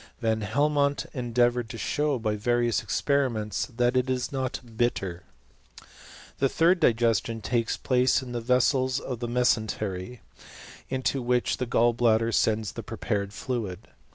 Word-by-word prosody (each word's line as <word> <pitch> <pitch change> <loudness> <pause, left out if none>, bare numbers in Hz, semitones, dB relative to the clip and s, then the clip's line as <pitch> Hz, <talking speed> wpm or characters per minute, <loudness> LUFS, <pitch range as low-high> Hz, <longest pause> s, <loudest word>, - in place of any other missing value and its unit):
Van 110 -2 0
Helmont 140 +6 +1
endeavoured 120 -2 +1
to 115 - -7
show 145 +3 0
by 110 -2 -1
various 120 +2 +1
experiments 125 -7 0
that 120 0 0
it^; 130 0 +1
is 130 +1 -1
not 130 -2 -2 0.2
bitter,. 95 -7 -1 0.6
.a. - - -20 0.5
The 135 - +3
'third 170 +5 +3
digestion 115 -4 +2
takes 115 +1 -1
place 130 +1 +2
in 125 - -8
the 120 -1 -3
vessels 130 +2 +2
ojfj^ 125 -3 -5
the 120 - -3
mesentery, 110 -3 -1 0.7
into 130 +1 -1
which 125 0 +1
the 125 - -3
gall 120 +1 +3
bladder 115 -1 +2
sends 110 -3 +1
tlif^ - - -8
r - - -2
prepared 100 -1 -3
fluid. 110 -5 -5
120 Hz, 150 wpm, -27 LUFS, 110-130 Hz, 0.7 s, The